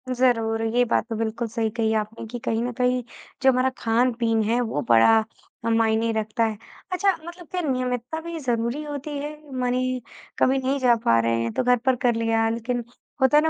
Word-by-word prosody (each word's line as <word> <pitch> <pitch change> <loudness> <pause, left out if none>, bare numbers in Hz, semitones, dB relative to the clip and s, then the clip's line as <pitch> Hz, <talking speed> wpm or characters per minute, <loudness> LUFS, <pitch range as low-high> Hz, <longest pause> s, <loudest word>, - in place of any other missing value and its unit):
ज़रूर, 230 -3 +2
ये 235 +2 +2
बात 230 - +1
तो 225 - -2
बिल्कुल 225 +1 -2
सही 225 0 -1
कही 220 0 0
आपने 220 +2 -8
कि 240 +2 -6
कहीं 225 -1 -1
न 245 - -2
कहीं, 250 +1 +1 0.4
जो 265 0 +6
हमारा 255 +1 +2
खान-पीन 230 -1 +1
है, 230 +3 +1
वो 225 -11 -2
बड़ा 120 - +6 0.5
ह - - +1
मायने 225 0 +2
रखता 220 +1 -1
है। 220 -1 -2 0.3
अच्छा, 390 +2 +3
मतलब 345 0 -10
क्या 365 - -1
नियमितता 255 0 -2
भी 335 0 -6
ज़रूरी 240 +1 -1
होती 290 0 -5
है? 290 +1 -4 0.3
मने 255 +1 0 0.4
कभी 265 +1 +4
नहीं 265 +1 0
जा 245 -2 +4
पा 115 0 +5
रहे 115 0 +1
हैं, 115 0 -2
तो - - 0
घर 250 0 +4
पर 260 -1 +4
कर 240 - +4
लिया, 225 0 +1
लेकिन 235 +2 -2 0.4
होता 265 +3 +5
है 300 - +5
ना, 320 - +3
240 Hz, 205 wpm, -24 LUFS, 225-255 Hz, 0.5 s, जो